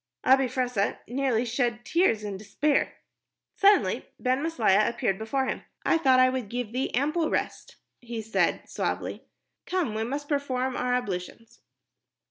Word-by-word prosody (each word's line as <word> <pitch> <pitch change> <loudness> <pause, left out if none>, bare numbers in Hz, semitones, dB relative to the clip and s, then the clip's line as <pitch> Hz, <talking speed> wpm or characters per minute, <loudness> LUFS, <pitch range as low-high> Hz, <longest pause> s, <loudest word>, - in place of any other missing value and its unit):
Abi 265 0 +5
Fressah 245 -5 -1
nearly 250 -2 0
shed 240 -1 -1
tears 335 - +2
in 205 -1 -4
his 190 - -7
despair. 290 +7 +1 0.6
Suddenly 400 +1 +3
Ben 255 +1 +1
Maslia 220 -11 +3
appeared 235 -5 -1
before 265 +5 -1
him. - - -3 0.2
"I 330 - +3
thought 260 -4 +5
I 255 - +7
would 255 -5 -2
give 245 -2 -3
thee 255 +3 -1
ample 305 +5 +1
rest," - - -3 0.2
he 235 -2 -6
said 220 - 0
suavely. - - -3 0.4
"Come, 360 -12 0
we 220 +1 -1
must 280 +5 -4
perform 260 -3 -1
our 250 0 0
ablutions." 215 -1 -5
250 Hz, 150 wpm, -27 LUFS, 225-275 Hz, 0.6 s, I